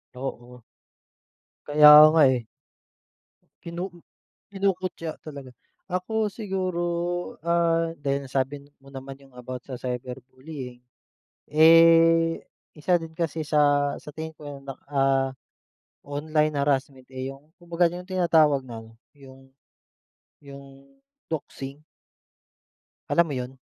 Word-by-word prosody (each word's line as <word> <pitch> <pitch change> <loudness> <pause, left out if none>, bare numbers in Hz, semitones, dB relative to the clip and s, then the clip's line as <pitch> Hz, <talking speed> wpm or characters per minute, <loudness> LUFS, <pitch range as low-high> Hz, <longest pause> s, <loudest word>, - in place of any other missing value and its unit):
Oo. 125 -1 -7 1.1
Kaya 150 0 +8 0.2
nga, 160 - +5
eh. 120 -3 -2 1.2
Kinu 175 +3 -5 0.6
kinukutiya 185 -4 -2
talaga. 140 -4 -10 0.4
Ako 215 +5 -1
siguro, 190 -4 -3 0.6
ah, 165 -1 +1
dahil 140 -1 -2
nasabi 135 +2 -2 0.2
mo 135 - -17
naman 135 0 -8
yung 135 - -21
about 125 0 -8
sa 130 -2 -8
cyberbullying, 125 +1 -7 0.7
eh, 165 +1 +5 0.3
isa 175 +3 +1
din 165 -1 -9
kasi 165 -2 -2
sa 145 -1 +2
sa 150 - -11
tingin 160 +1 -7
ko 145 -2 -9
na, 135 -1 -7 0.2
ah, 135 -1 +2 0.8
online 150 +1 -1
harassment, 135 -2 -1
eh, 130 +1 -4
yung 145 +4 -16
kumbaga 175 0 0
yung 180 +2 -8
tinatawag 160 -7 +2
na 115 -2 -8
ano, 110 - -17 0.2
yung 135 -1 -16 0.9
yung 140 - -14 0.3
doxing. 140 -2 -6 1.3
Alam 170 - +3
mo 145 - -5
yun? 130 0 -5
145 Hz, 110 wpm, -25 LUFS, 135-165 Hz, 1.3 s, Kaya